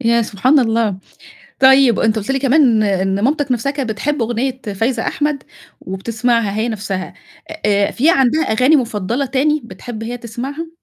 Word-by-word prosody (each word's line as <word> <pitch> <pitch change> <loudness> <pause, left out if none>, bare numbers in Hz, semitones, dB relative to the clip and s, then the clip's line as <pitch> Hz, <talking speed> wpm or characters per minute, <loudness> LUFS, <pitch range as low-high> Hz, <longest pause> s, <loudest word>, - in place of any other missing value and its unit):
يا 235 -1 +2
سبحان 245 +7 +2
الله! 225 -5 +1 0.6
طيب، 265 -3 +5
أنت 225 0 +2
قُلت 210 +4 -4
لي 270 - +1
كمان 260 -5 +3
إن 195 -1 0
مامتك 285 0 +1
نفْسَها 245 +3 -1
كانت 275 -5 -3
بتحب 280 +5 -2
أغنية 245 +3 -2
فايزة 225 +3 -1
أحمد 295 -2 -1 0.4
وبتسمعها 225 +3 -1
هي 220 +2 -1
نفْسَها، 200 -4 -4 0.5
آآ، 200 -1 +2
في 290 +7 +2
عندها 270 +1 +2
أغاني 255 +7 +3
مُفضّلة 235 +1 -2
تاني 290 +4 +1
بتحب 230 -1 -9
هي 240 +2 -4
تسمعها؟ 255 +7 -6
240 Hz, 155 wpm, -17 LUFS, 220-270 Hz, 0.6 s, طيب